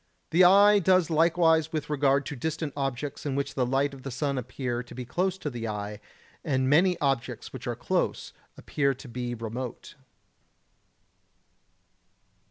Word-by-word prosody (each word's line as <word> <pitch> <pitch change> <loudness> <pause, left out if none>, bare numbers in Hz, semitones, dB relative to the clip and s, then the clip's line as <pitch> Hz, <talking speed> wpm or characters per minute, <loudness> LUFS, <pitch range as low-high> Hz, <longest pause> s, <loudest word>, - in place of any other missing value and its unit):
The 175 +3 +5
eye 200 +3 +7
does 185 -2 +3
likewise 160 0 +3
with 155 -2 -3
regard 140 -1 +2
to 145 - -5
distant 155 +2 -3
objects 140 0 -3
which 140 -1 -2
in - - -17
the 125 -2 +1
light 135 +2 +1
of 135 - -11
the 135 - -6
sun 140 +1 -2
appear 125 0 -4
to 120 - -12
be 125 0 -6
close 185 +9 -1
to 155 - -4
the 115 -2 -5
eye, 105 -1 -5 0.4
and 130 -2 0
many 175 +6 +4
objects 135 -5 -2
which - - -7
are - - -2
close - - -2 0.2
appear 140 -2 0
to 135 - -12
be 120 0 -4
remote. 115 +2 -6
140 Hz, 160 wpm, -27 LUFS, 125-160 Hz, 0.4 s, eye